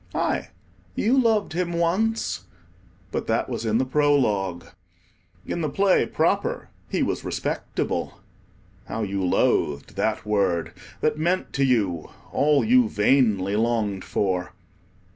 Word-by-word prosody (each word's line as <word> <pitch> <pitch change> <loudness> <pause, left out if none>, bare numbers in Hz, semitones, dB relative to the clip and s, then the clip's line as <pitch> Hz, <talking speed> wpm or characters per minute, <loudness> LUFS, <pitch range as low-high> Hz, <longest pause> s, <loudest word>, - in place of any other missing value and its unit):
aye, - - -1 0.5
you 235 +5 +2
loved 225 -8 +2
him 175 0 -1
once—but 95 - -3
that - - +1
was 115 - -4
in 110 0 +2
the 130 - +1
Prologue. 125 - +1 0.8
In 170 - -3
the 155 - -1
Play 195 +6 +3
proper, - - 0 0.2
he - - 0
was - - -2
respectable. - - -3 0.7
(How 110 - -3
you 100 -1 -2
loathed 75 -5 +1
that - - -1
word, 95 -6 0 0.3
that 150 0 +1
meant 175 +4 0
to 140 - +1
you 100 - +1 0.2
all 145 +1 +3
you 245 0 +4
vainly 105 - +2
longed 110 -4 0
for!) 90 -3 -1
115 Hz, 125 wpm, -24 LUFS, -, 0.8 s, you